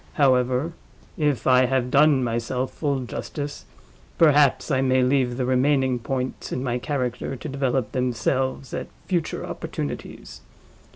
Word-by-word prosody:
—However, 130 +2 +2 0.4
if 150 -4 0
I 130 0 +5
have 125 -1 0
done 140 -2 +5
myself 120 +2 -2
full 140 -3 -1
justice, 145 +4 -6 0.5
perhaps 150 -2 +4
I 130 -1 +2
may 130 -1 +3
leave 125 -2 +1
the 130 - 0
remaining 130 0 +2
points 130 +2 -4
in 125 - -2
my 125 -1 -1
character 125 -1 -3
to 135 - -7
develop 135 -5 -1
themselves 130 +2 -1
at - - -4 0.2
future 175 -4 -2
opportunities. - - -6
130 Hz, 130 wpm, -24 LUFS, 125-140 Hz, 0.5 s, I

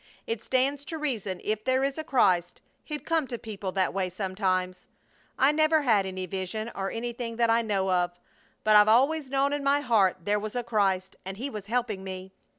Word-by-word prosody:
It 230 -1 -3
stands 265 +3 0
to 325 - -5
reason 220 - -3
if 215 0 -2
there 260 +2 +2
is 275 +2 -1
a - - -3
Christ 180 - +2 0.2
He'd 300 -1 -6
come 325 -4 +1
to 240 - -4
people 205 -4 -6
that 190 -2 +1
way 190 -1 -1
sometimes. 185 -1 -2 0.5
I 270 +2 +5
never 310 0 +3
had 210 -7 +3
any 185 0 -4
vision, 190 +5 -4
or 195 0 -3
anything 235 0 -4
that 230 0 +2
I 230 +1 +4
know 195 -4 0
of, 180 -1 +2 0.5
but 215 0 +4
I've 210 0 +8
always 270 +6 +3
known 275 +1 +1
in 290 -1 -2
my 280 +1 +3
heart 215 -9 +3
there 205 +3 +1
was 215 +2 -6
a 245 - -1
Christ 195 -5 0
and 190 +1 -6
He 270 +5 -4
was 210 -3 -7
helping 225 -4 -1
me! 190 0 -7
220 Hz, 205 wpm, -27 LUFS, 190-265 Hz, 0.5 s, I've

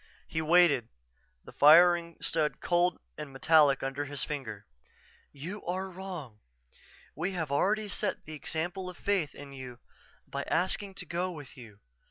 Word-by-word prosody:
_" - - -30 0.2
He 160 - -2
waited, 160 -7 +4 0.6
the - - -12
firing 170 +2 +6
stud 155 -2 0
cold 175 0 +2 0.2
and 150 -2 -6
metallic 145 0 +4
under 135 +2 -2
his 145 0 -3
finger. 120 -9 -5 0.7
"_You 175 +9 -7
are 190 +1 -2
wrong. 175 - -8 0.7
We 180 +6 -3
have 160 -6 -3
already 210 +9 +1
set 200 - -2
the 155 - -8
example 175 +5 -4
of 180 - -10
faith 190 -8 0
in 140 -1 -10
you 130 -2 -8 0.5
by - - -4
asking 190 +3 0
to - - -6
go 175 +2 -2
with 145 -6 -10
you. 110 -5 -13
160 Hz, 155 wpm, -30 LUFS, 140-180 Hz, 0.7 s, firing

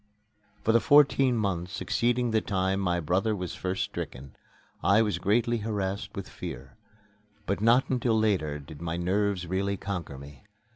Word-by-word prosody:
For 110 - +3
the 115 - +5
fourteen 135 -3 +4
months 95 -3 -2
succeeding 120 +3 0
the 110 -1 +2
time 95 -1 0
my 90 -2 0
brother 95 +7 0
was 90 -3 -5
first 95 +1 -2
stricken, 65 +2 -7 0.5
I 100 +4 +5
was 105 -5 -1
greatly 115 +5 +1
harassed 100 -2 -3
with - - -5
fear; 65 +1 -8 0.7
but - - -1
not 120 +4 +4
until 120 -3 +1
later 95 -9 +1
did 75 +1 -11
my 85 0 -3
nerves 95 +1 0
really 100 +3 -1
conquer 90 -8 -5
me. 70 +5 -12
100 Hz, 155 wpm, -28 LUFS, 85-110 Hz, 0.7 s, the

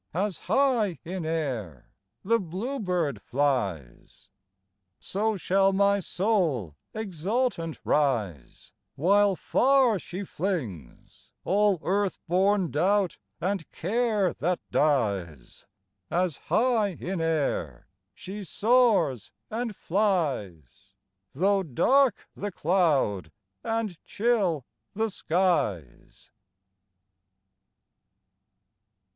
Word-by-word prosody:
As 190 0 -1
high 230 -6 +2
in 175 -1 -4
air 125 - -4 0.3
the 230 +4 +2
bluebird 180 - -2
flies, 120 - -2 0.7
So 215 +2 -1
shall 195 +2 +2
my 200 +1 +3
soul 170 - 0 0.2
exultant 200 -2 -2
rise, 110 - -1 0.2
While 195 +7 +3
far 255 -1 +3
she 185 +3 -6
flings 145 - -5
All 205 0 +3
earth 195 0 0
born 190 +1 +2
doubt 190 +4 +1 0.2
and 185 -1 -2
care 210 -1 0
that 180 +2 -1
dies, 100 - -1 0.4
As 175 -4 0
high 220 -6 +2
in 180 -1 -3
air 145 - -1 0.3
she 200 +2 -7
soars 200 - +2 0.2
and 230 -1 -3
flies, 145 - -2 0.4
Though 195 +6 +2
dark 240 - +2
the 205 0 -5
cloud, 155 - +1 0.3
and 225 -7 -3
chill 200 - 0 0.3
the 220 +1 -1
skies. 160 - -1
185 Hz, 85 wpm, -27 LUFS, 145-205 Hz, 0.7 s, my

